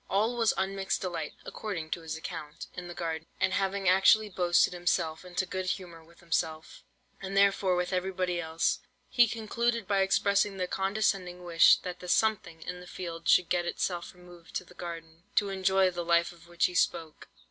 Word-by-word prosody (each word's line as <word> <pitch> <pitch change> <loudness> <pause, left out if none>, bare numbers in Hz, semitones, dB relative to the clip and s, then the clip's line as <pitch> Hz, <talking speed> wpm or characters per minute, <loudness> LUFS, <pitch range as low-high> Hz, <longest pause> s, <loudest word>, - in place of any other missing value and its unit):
"All 215 +5 +1
was 230 -2 +3
unmixed 195 0 -1
delight 170 -5 -4
(according 175 -7 -5
to 170 - -2
his 160 -1 -5
account) 160 -2 -7
in 180 -1 -7
the 175 - -8
garden, 165 -1 -4
and 190 - +2
having 195 0 0
actually 195 +3 +5
boasted 180 -1 +3
himself 175 -2 -1
into 180 +1 -2
good 185 +1 -4
humour 175 -3 -4
with 170 +2 -21
himself, 160 -2 -3 0.4
and 195 +1 -4
therefore 195 -2 +4
with 180 +1 -1
everybody 180 -1 -1
else, 160 0 0 0.3
he 240 -1 +5
concluded 230 0 -1
by 200 -1 +2
expressing 200 +1 +2
the 185 - 0
condescending 190 -2 -1
wish, 170 -1 +6
that 180 -1 -5
the 180 - -9
'something' 175 -5 +1
in 180 0 -6
the 180 - -12
field 170 -2 -5
should 180 - +5
get 175 -1 +1
itself 175 0 -3
removed 175 -1 -15
to - - -1
the 180 - -17
garden, 165 -2 -8
to 205 -2 +3
enjoy 190 -1 +2
the 175 -1 -4
life 170 0 +2
of 170 -1 -17
which 175 0 +1
he 180 - -1
spoke. 160 -3 -1
180 Hz, 185 wpm, -29 LUFS, 170-195 Hz, 0.4 s, wish